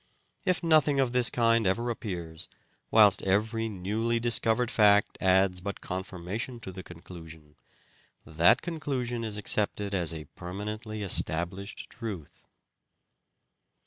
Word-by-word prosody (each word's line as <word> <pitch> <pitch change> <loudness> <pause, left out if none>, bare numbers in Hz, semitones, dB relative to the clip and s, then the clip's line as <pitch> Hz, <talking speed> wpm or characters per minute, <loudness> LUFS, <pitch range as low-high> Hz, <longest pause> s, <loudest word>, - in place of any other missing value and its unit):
If 185 -1 +1
nothing 155 -4 +4
of 130 -3 +2
this 125 -1 +3
kind 115 -3 +2
ever 115 +6 0
appears, 85 -8 -6 0.4
whilst 105 -3 +6
every 110 +4 0
newly 110 +4 -1
dis 120 0 0
covered 115 +1 +1
fact 105 -1 +4
adds 95 -1 +3
but 100 +1 -5
confirmation 95 +6 -5
to 95 - -7
the 95 0 -8
conclusion, 80 -4 -12 0.7
that 80 +2 +4
conclusion 135 -8 -3
is 105 -2 -4
accepted 105 -1 0
as 85 -4 +1
a 80 -2 -6
permanently 105 +4 -6
estab 85 -3 0
lished 100 +1 -8
truth. 105 - -8
105 Hz, 125 wpm, -28 LUFS, 90-115 Hz, 0.7 s, whilst